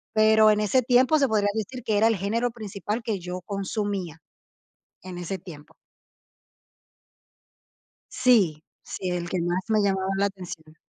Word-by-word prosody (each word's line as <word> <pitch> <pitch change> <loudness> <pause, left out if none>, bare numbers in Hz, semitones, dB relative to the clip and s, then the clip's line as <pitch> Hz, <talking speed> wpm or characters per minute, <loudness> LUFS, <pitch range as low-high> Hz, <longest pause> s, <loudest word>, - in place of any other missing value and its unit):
pero 215 0 +6
en 210 0 +2
ese 215 +5 +2
tiempo 255 +5 +4
se 275 -2 +2
podría 210 -2 +1
decir 225 +4 -4
que 215 - 0
era 220 - +4
el 225 -1 +3
género 225 +6 -1
principal 215 0 -5
que 220 -3 -2
yo 180 +1 -6
consumía. 195 -3 -3 0.9
En 185 -1 -8
ese 180 +2 -4
tiempo. 155 -4 -13 2.4
Sí, 190 -12 +3 0.2
sí, 185 - -5
el 175 -1 -3
que 185 - -2
más 175 +2 0
me 215 -1 +3
llamaba 190 -1 0
la 200 +1 +2
atención. 180 -5 -8
200 Hz, 150 wpm, -25 LUFS, 180-220 Hz, 2.4 s, pero